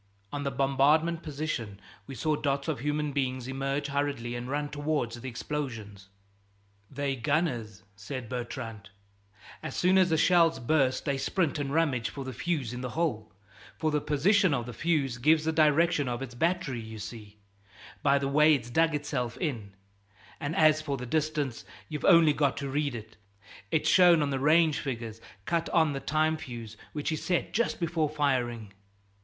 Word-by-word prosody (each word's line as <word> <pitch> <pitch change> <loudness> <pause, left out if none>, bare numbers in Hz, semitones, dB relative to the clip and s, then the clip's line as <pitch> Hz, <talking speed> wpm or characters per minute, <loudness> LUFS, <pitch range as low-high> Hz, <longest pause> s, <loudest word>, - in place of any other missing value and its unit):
On 145 - -2
the 140 - 0
bombarded 140 +5 +2
position 140 -10 -4 0.3
we 135 - -7
saw 155 +6 0
dots 140 -1 -1
of 155 -6 -1
human 150 +2 -1
beings 130 -3 -2
emerge 135 +2 -2
hurriedly 140 -4 -2
and 120 +1 -5
run 145 +1 -1
towards 145 -5 -2
the 130 - -5
explosions. 115 -7 -5 0.8
"They're 140 0 -2
gunners," 120 - -1
said 115 +5 -6
Bertrand; 115 -4 -6 0.7
"as - - -6
soon 185 +1 +4
as 185 -2 +3
a 160 - +3
shell's 165 0 +4
burst 130 0 +1
they 140 -2 0
sprint 160 +2 0
and 140 -1 -2
rummage 140 -7 +1
for 135 +4 -7
the 130 - -5
fuse 130 -2 -2
in 125 - -5
the 125 - -4
hole, 120 -11 -1 0.5
for 155 -1 0
the 150 -1 +1
position 180 +4 +3
of 120 -3 -3
the 125 - -7
fuse 140 -3 0
gives 155 +4 +3
the 160 - +2
direction 155 -2 +3
of 120 +2 -3
its 125 -2 -8
battery, 155 -3 -1
you 110 0 -9
see, 105 0 -9 0.6
by 140 - +4
the 140 0 -1
way 150 +2 +5
it's 120 -3 -6
dug 160 +2 +3
itself 125 -5 -3
in; 115 - -4 0.6
and 145 +1 -3
as 155 -1 +5
for 145 -3 -3
the 125 - -6
distance, 150 -2 -1 0.3
you've 150 -2 -4
only 165 -5 +6
got 140 -2 +1
to 140 - -3
read 145 -2 -1
it 110 -1 -9 0.5
it's 155 -1 +1
shown 175 -3 +6
on 140 - -1
the 135 - -1
range 155 +2 +4
figures 115 -4 -5 0.2
cut 170 -1 0
on 160 -4 +3
the 135 - -3
time 155 +2 +1
fuse 115 -6 -8 0.2
which 150 +1 -3
is 155 - -2
set 175 -2 -1
just 235 +2 0
before 165 -3 0
firing." 120 -8 -1
140 Hz, 175 wpm, -29 LUFS, 120-155 Hz, 0.8 s, only